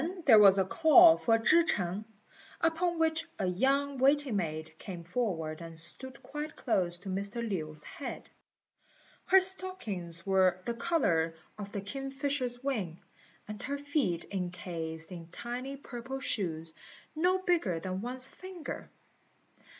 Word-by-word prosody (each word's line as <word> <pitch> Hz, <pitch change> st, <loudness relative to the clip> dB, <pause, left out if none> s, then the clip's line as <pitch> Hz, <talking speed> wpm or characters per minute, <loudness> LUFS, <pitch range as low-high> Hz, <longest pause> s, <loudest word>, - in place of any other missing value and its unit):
There 225 Hz, -6 st, +8 dB
was 200 Hz, -2 st, +8 dB
then 190 Hz, -1 st, +2 dB
a -, -, -13 dB
call 330 Hz, -, +7 dB
for 225 Hz, -7 st, +2 dB
Chih 310 Hz, +9 st, +5 dB
ch'eng, 195 Hz, -, -1 dB, 0.5 s
upon 335 Hz, +1 st, +1 dB
which 320 Hz, 0 st, +1 dB
a 195 Hz, -, -1 dB
young 270 Hz, +9 st, +1 dB
waiting 275 Hz, -2 st, +3 dB
maid 155 Hz, -3 st, -3 dB
came 180 Hz, -4 st, -7 dB
forward 170 Hz, -5 st, -2 dB
and 165 Hz, -1 st, -8 dB
stood 260 Hz, +11 st, 0 dB
quite 300 Hz, +2 st, -6 dB
close 180 Hz, -8 st, 0 dB
to 180 Hz, +2 st, -9 dB
Mr. 200 Hz, +5 st, -2 dB
Lin's 155 Hz, -6 st, -3 dB
head. 280 Hz, -, -7 dB, 0.9 s
Her 385 Hz, -, +7 dB
stockings 230 Hz, -, -4 dB
were 190 Hz, -2 st, +3 dB
the 235 Hz, -, -1 dB
colour 205 Hz, -, +1 dB, 0.2 s
of 200 Hz, -1 st, -6 dB
the 200 Hz, -, -4 dB
kingfisher's 270 Hz, +2 st, -3 dB
wing, 205 Hz, -12 st, -2 dB, 0.5 s
and 210 Hz, 0 st, -7 dB
her 285 Hz, 0 st, -3 dB
feet 285 Hz, -, 0 dB
encased 170 Hz, -3 st, -5 dB
in 170 Hz, -2 st, -8 dB
tiny 245 Hz, +9 st, -6 dB
purple 260 Hz, 0 st, -7 dB
shoes, 165 Hz, -, -2 dB, 0.4 s
no 360 Hz, +4 st, +3 dB
bigger 320 Hz, -, +1 dB
than 185 Hz, +2 st, -4 dB
one's 255 Hz, +2 st, +1 dB
finger. 370 Hz, -3 st, -8 dB
225 Hz, 140 wpm, -31 LUFS, 175-285 Hz, 0.9 s, There